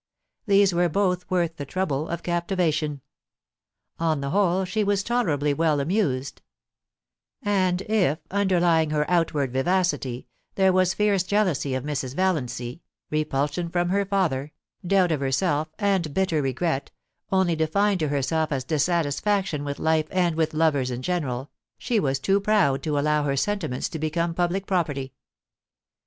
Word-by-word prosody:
These 200 -2 +4
were 175 0 +2
both 180 0 0
worth 170 -3 0
the 145 - -5
trouble 155 -4 -1
of 170 0 -4
captivation. 170 -5 -1 1.0
On 160 -3 +1
the 140 0 -3
whole, 190 0 +2
she 210 +4 -1
was 200 -1 +1
tolerably 155 - +1
well 155 0 +1
amused; 140 -5 -1 1.0
and 190 -3 +1
if, 195 -9 +1
underlying 175 -5 +2
her 150 0 +1
outward 155 -7 +1
vivacity, 145 -4 0 0.3
there 190 -1 +4
was 185 0 +2
fierce 205 -2 +2
jealousy 180 -9 0
of 130 - -3
Mrs. 140 -3 -3
Valiancy, 130 -7 -1 0.3
repulsion 150 +2 -1
from 175 0 0
her 200 +2 +2
father, 170 -8 -1 0.3
doubt 185 -1 +3
of 155 - 0
herself, 145 +3 0
and 195 -8 0
bitter 185 -5 +1
regret, 135 +2 -1 0.4
only 190 -3 +2
defined 190 +5 +1
to 155 - 0
herself 150 +3 0
as 135 -2 -1
dis 150 0 +1
satisfaction 170 0 0
with 140 -1 -4
life 160 -1 +1
and 175 -3 +1
with 160 -1 0
lovers 150 -5 +2
in 125 0 -5
general, 145 -6 -2 0.3
she 240 -4 0
was 135 -6 0
too 195 +9 +2
proud 200 -10 +2
to 150 -2 -1
allow 150 +1 +2
her 140 -1 -1
sentiments 165 -7 -1
to 160 - -6
become 165 +2 -1
public 180 +3 -1
property. 145 -9 -1
165 Hz, 150 wpm, -25 LUFS, 145-190 Hz, 1.0 s, These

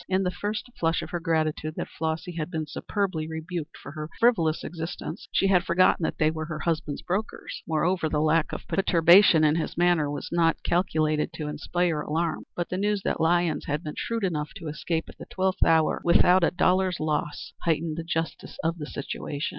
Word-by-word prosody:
In 190 0 +2
the 180 - 0
first 205 +4 -3
flush 165 0 +1
of - - -8
her 175 - -2
gratitude 155 -2 -1
that - - -3
Flossy 160 +2 -3
had 165 -2 -4
been 160 -3 -3
superbly 180 0 -2
rebuked 160 0 -5
for 145 - -10
her 155 0 -6
frivolous 170 -10 +3
existence, 165 0 -6
she - - +2
had 185 -3 +4
forgotten 180 +1 +3
that - - -2
they 155 -1 +3
were 160 0 -4
her 155 -1 -5
husband's 155 -4 -2
brokers. 200 +5 -4
Moreover 165 +1 +1
the 150 - 0
lack 155 +1 +2
of - - -7
perturbation 175 -2 +5
in 155 +1 +4
his 165 - -3
manner 175 -4 +3
was 145 -1 -5
not 165 -1 +2
calculated 155 -4 +1
to 150 - -5
inspire 155 +2 -1
alarm. 160 +2 -2
But 175 - -3
the 185 - -2
news 205 -1 0
that - - -1
Lyons 170 -1 +2
had 150 +3 -2
been 150 - -5
shrewd 230 -2 -3
enough 155 -5 -1
to 165 -3 -6
escape 160 +2 -2
at - - -14
the - - -9
twelfth 190 0 +1
hour 160 -1 +3
without 180 +1 +5
a - - +5
dollar's 180 0 +2
loss 150 -1 -2
heightened 160 -1 0
the 165 - -4
justice 165 -1 -4
of 165 +1 -1
the 150 - -5
situation. 140 +1 -4
165 Hz, 200 wpm, -26 LUFS, 155-180 Hz, -, perturbation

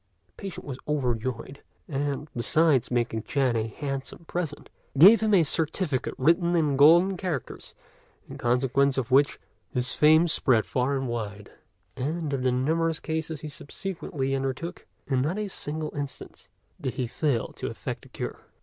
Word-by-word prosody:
The 85 - -39
patient 195 -2 -7
was 130 -3 -6
overjoyed; 130 -2 -2 0.3
and, 145 0 -2
besides 135 +1 +3
making 120 -2 0
Chang 130 0 0
a 110 0 0
handsome 135 +5 -6
present, 160 -4 -4 0.3
gave 200 +10 +9
him 215 -2 +3
a 175 - +6
certificate 155 -1 0
written 170 +5 +3
in 150 -4 +2
golden 170 +7 +6
characters, 170 -8 -5 0.5
in - - -9
consequence 130 +3 +2
of 130 -3 -2
which 140 +2 +4 0.3
his 125 -1 0
fame 155 +3 +5
spread 125 -8 +3
far 130 +2 0
and 135 -1 -2
wide; 105 -4 -5 0.4
and 150 +3 -2
of 135 - -1
the 130 0 +2
numerous 160 +6 0
cases 160 -1 -3
he 155 - -6
subsequently 145 -2 -4
undertook, 135 +6 -4 0.2
in 130 -2 +1
not 160 +9 -1
a 210 -1 -2
single 155 -4 -5
instance 140 -1 -7 0.3
did 130 - -3
he 130 -2 -1
fail 125 0 -1
to - - -6
effect - - -5
a - - -15
cure. - - -5
140 Hz, 160 wpm, -27 LUFS, 130-160 Hz, 0.5 s, gave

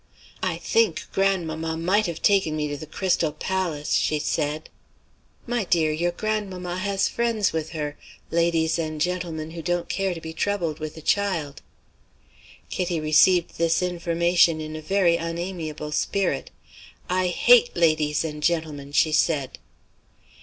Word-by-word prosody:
"I 185 -3 -1
think 220 0 +1
grandmamma 165 -5 0
might 190 +6 +2
have 165 -1 -6
taken 190 -6 +3
me 150 -1 -1
to 145 - -3
the 150 +2 -8
Crystal 170 -1 0
Palace," 165 -2 -3
she 155 - +2
said. 150 +1 -2 0.8
"My 240 -2 -1
dear, 165 -4 +2
your 170 +3 0
grandmamma 185 -2 -3
has 200 0 +1
friends 230 -3 0
with 160 -1 -2
her 150 -2 -4 0.3
ladies 165 -1 +2
and 155 -1 -3
gentlemen 165 -2 -2
who 165 0 -6
don't 175 +1 -1
care 195 -2 -1
to - - -6
be 160 0 -7
troubled 170 -4 -1
with 155 0 -6
a 160 - -10
child." 170 -9 0 1.1
Kitty 175 -2 -1
received 160 +4 +3
this 165 +1 +2
information 170 -1 +2
in 155 0 -6
a 155 - -6
very 175 0 +2
unamiable 165 -3 -4
spirit. 195 +5 -1 0.6
"I 185 0 +1
hate 240 +7 +5
ladies 155 -2 +2
and 150 -1 -5
gentlemen!" 150 -4 -1
she 155 +2 +3
said. 150 -4 +1
170 Hz, 145 wpm, -24 LUFS, 155-185 Hz, 1.1 s, hate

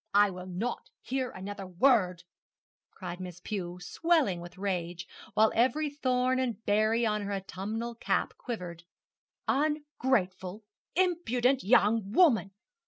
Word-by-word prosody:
'I 205 -1 +6
will 180 0 -7
not 195 +7 -3
hear 260 0 -1
another 195 0 -7
word!' 180 -3 +3 0.7
cried 180 -1 -7
Miss 180 -2 -7
Pew, 180 -2 -4
swelling 275 - +1
with 175 +1 -10
rage, 180 -3 -2 0.3
while 220 +1 +5
every 270 +6 +2
thorn 255 -2 +1
and 235 -4 -2
berry 215 +3 +3
on 210 -1 +1
her 200 0 -4
autumnal 205 +4 -4
cap 230 - 0
quivered. 180 -8 -6 0.6
'Ungrateful, 260 -10 0 0.3
impudent 275 -8 +2
young 210 -1 +3
woman! 235 - +5
215 Hz, 120 wpm, -30 LUFS, 185-255 Hz, 0.7 s, I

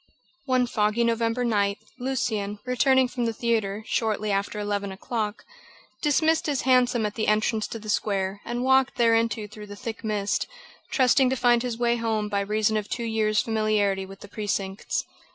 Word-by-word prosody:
One 255 -1 +3
foggy 215 0 +1
November 230 +1 +1
night, 200 -3 +1 0.2
Lucian, 220 -6 -2
returning 260 +1 +3
from 245 -1 -3
the 230 - 0
theatre, 220 -3 -1
shortly 215 -2 0
after 200 +1 -1
eleven 205 -1 -2
o'clock, 210 +2 -4 0.6
dismissed 315 +2 +2
his 285 -3 0
hansom 250 -3 +3
at 210 - -2
the 220 - -2
entrance 215 +1 +1
to - - -6
the 215 -1 -11
square 200 -2 -1
and 240 +1 -3
walked 265 0 +3
thereinto 230 -2 +2
through 210 0 -10
the 205 - -8
thick 230 +1 -6
mist, 210 -2 -1 0.4
trusting 260 0 +4
to 260 - +1
find 240 -1 +3
his 245 -2 -3
way 240 0 +2
home 220 -2 -1
by 200 -1 0
reason 215 +2 +1
of 210 -1 -4
two 235 - -3
years' 215 -2 +1
familiarity 210 -3 0
with 195 0 -12
the - - -9
precincts. 200 -2 -3
220 Hz, 170 wpm, -25 LUFS, 210-240 Hz, 0.6 s, trusting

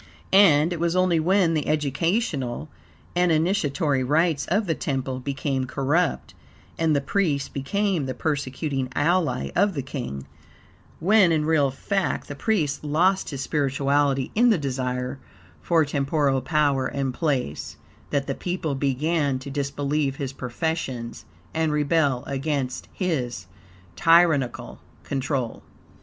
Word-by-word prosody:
And 170 -4 +6
it 170 - -5
was 170 +1 0
only 185 -2 +3
when 180 +1 +3
the 155 -2 -1
educational 150 - -1 0.5
and 180 -1 +3
initiatory 155 -5 +1
rites 150 +2 +1
of 205 +5 +1
the 165 - +1
temple 135 -3 -3
became 135 0 -2
corrupt, 145 +6 0 0.4
and 160 -2 +1
the 140 - +2
priest 145 -4 -1
became 180 +2 -1
the 130 - -4
persecuting 140 -1 -2
ally 160 - +1
of 200 -1 +2
the 140 - -2
king 120 - -5 0.7
when, 190 +1 +5
in 155 -2 +1
real 155 -3 +3
fact, 195 +8 -2
the - - -4
priest 155 -5 0
lost 175 +6 +2
his 140 -3 -5
spirituality 140 -1 +1
in 240 +3 +4
the 220 - +4
desire 130 -2 -3 0.4
for 160 - +3
temporal 140 -1 +1
power 140 -2 +1
and 135 -2 -2
place, 130 - -2 0.3
that 140 -1 0
the 135 - -2
people 175 -1 -3
began 140 +1 0
to 135 +2 -8
disbelieve 140 0 -1
his 135 -1 -4
professions 125 -3 -4 0.3
and 160 -1 +1
rebel 145 -3 +1
against 135 -2 -2
his 125 - -2 0.5
tyrannical 165 - +3 0.2
control. 135 -3 -2
145 Hz, 130 wpm, -24 LUFS, 135-165 Hz, 0.7 s, And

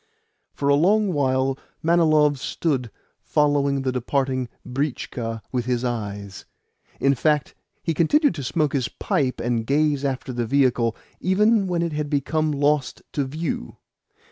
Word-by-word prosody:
For 140 - -3
a 140 - +5
long 195 +6 +3
while 130 -2 +1 0.2
Manilov 155 -4 +4
stood 130 -3 -1 0.3
following 140 -2 +1
the 130 - 0
departing 130 0 -1 0.2
britchka 125 -4 -3
with 125 -2 -1
his 125 0 0
eyes. 100 -5 -4 0.6
In 140 0 +3
fact, 150 +2 +1 0.3
he 165 - 0
continued 290 - +3
to 140 - -6
smoke 150 +2 0
his 130 -4 0
pipe 130 -3 -1
and 120 -1 0
gaze 145 +2 +1
after 130 -2 -2
the 120 -1 -2
vehicle 125 -3 +2 0.2
even 205 +2 +3
when 175 -2 0
it 170 -2 -2
had 150 -1 -2
become 155 +2 0
lost 145 -1 0
to 140 - -1
view. 145 - -4
140 Hz, 145 wpm, -23 LUFS, 125-155 Hz, 0.6 s, a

